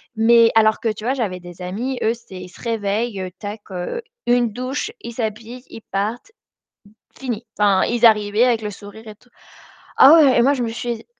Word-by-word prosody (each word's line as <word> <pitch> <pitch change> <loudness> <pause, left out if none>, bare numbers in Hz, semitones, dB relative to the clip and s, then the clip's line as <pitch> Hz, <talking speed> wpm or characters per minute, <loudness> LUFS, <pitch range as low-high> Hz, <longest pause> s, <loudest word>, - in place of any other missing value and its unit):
Mais 230 +1 +5
alors 220 -1 +3
que 225 - -1
tu 215 0 -11
vois? 255 +3 0
J'avais 200 -8 -3
des 175 0 -11
amis, 235 +9 -4
eux, 225 - +2
c'était, 195 -6 -12
ils 180 - -10
se - - -17
réveillent, 210 -3 -2
tac, 205 +1 -7 0.7
une 240 -3 +2
douche, 260 - -4
ils 235 - -8
s'habillent, 230 +2 -5
ils 225 - -10
partent, 215 - -4 0.9
fini. 240 -3 -5
Enfin, 200 -2 +3
ils 240 0 +3
arrivaient 210 +1 +3
avec 230 -3 +1
le 210 - -4
sourire 205 +2 -12
et 215 - -9
tout. 245 +4 -28 0.7
Ah, 275 +3 +8
ouais, 290 -6 +5
et - - +5
moi, 275 +3 +4
je 255 - -2
me 235 - -2
suis 235 0 -5
225 Hz, 195 wpm, -20 LUFS, 205-240 Hz, 0.9 s, Ah